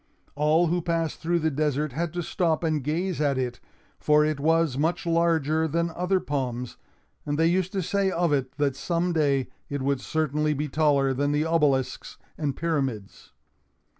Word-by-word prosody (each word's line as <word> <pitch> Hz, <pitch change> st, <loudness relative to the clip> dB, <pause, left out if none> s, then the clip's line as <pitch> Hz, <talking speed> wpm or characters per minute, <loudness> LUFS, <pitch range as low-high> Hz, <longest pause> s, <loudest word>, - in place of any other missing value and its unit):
All 155 Hz, +4 st, +3 dB
who 175 Hz, +1 st, 0 dB
passed 165 Hz, -1 st, -1 dB
through 170 Hz, +1 st, 0 dB
the 160 Hz, 0 st, +1 dB
desert 150 Hz, 0 st, 0 dB
had 165 Hz, +5 st, -2 dB
to 175 Hz, -1 st, -2 dB
stop 165 Hz, -1 st, 0 dB
and 155 Hz, -4 st, 0 dB
gaze 165 Hz, +4 st, -1 dB
at 140 Hz, -3 st, +1 dB
it, 125 Hz, -2 st, -2 dB, 0.4 s
for 150 Hz, 0 st, +4 dB
it 155 Hz, -2 st, -1 dB
was 160 Hz, -1 st, +2 dB
much 160 Hz, +6 st, 0 dB
larger 160 Hz, -2 st, +2 dB
than 170 Hz, +2 st, -1 dB
other 180 Hz, +3 st, 0 dB
palms; 125 Hz, -5 st, -3 dB, 0.5 s
and 145 Hz, 0 st, -2 dB
they 160 Hz, -, +3 dB
used 180 Hz, +2 st, +1 dB
to 190 Hz, -2 st, -1 dB
say 195 Hz, +3 st, +1 dB
of 170 Hz, -4 st, +1 dB
it, 130 Hz, -2 st, -1 dB
that 145 Hz, -3 st, +1 dB
some 170 Hz, +4 st, -1 dB
day 140 Hz, -5 st, +1 dB, 0.2 s
it 140 Hz, -2 st, -3 dB
would 140 Hz, -1 st, 0 dB
certainly 150 Hz, -1 st, 0 dB
be 150 Hz, +2 st, -2 dB
taller 140 Hz, -2 st, +2 dB
than 145 Hz, +2 st, 0 dB
the 150 Hz, +1 st, +1 dB
obelisks 150 Hz, -5 st, 0 dB, 0.2 s
and 145 Hz, -4 st, -2 dB
pyramids. 135 Hz, -11 st, -3 dB
155 Hz, 175 wpm, -26 LUFS, 140-165 Hz, 0.5 s, for